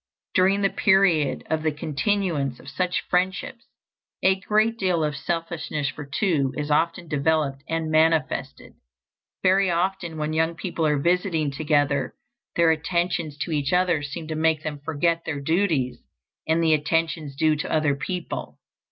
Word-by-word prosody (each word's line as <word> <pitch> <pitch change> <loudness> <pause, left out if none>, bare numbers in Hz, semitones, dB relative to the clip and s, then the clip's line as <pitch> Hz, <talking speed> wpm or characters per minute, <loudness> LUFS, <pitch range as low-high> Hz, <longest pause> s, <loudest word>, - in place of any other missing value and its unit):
During 195 +2 +3
the 195 - +3
period 190 -8 +3
of 160 -1 0
the 155 0 +1
continuance 150 - -1
of - - -15
such 180 +6 -1
friendships, 190 +8 -1 0.6
a 190 - +6
great 215 +3 +1
deal 180 -4 +1
of 150 -1 -1
"selfishness 165 -3 -3
for 145 +2 -7
two" 150 -10 +1
is 150 0 -2
often 170 +3 +1
developed 145 -2 0
and 160 -1 -1
manifested. 160 0 +1 0.7
Very 190 0 +4
often 175 -1 -1
when 155 0 -2
young 160 +1 +1
people 165 -2 -2
are 150 -1 +2
visiting 170 -1 +1
together 145 -1 0 0.4
their 170 -1 +4
attentions 170 -1 -1
to 170 - -2
each 145 -2 0
other 180 -4 +2
seem 145 +3 -6
to 155 - -2
make 160 0 +1
them 150 -2 -4
forget 160 +3 0
their 145 -3 -3
duties 160 -4 0 0.5
and 160 +1 +2
the 160 -1 +4
attentions 160 -1 0
due 155 +2 +3
to 155 - -4
other 155 -2 +2
people. 180 +4 -5
160 Hz, 150 wpm, -24 LUFS, 150-180 Hz, 0.7 s, a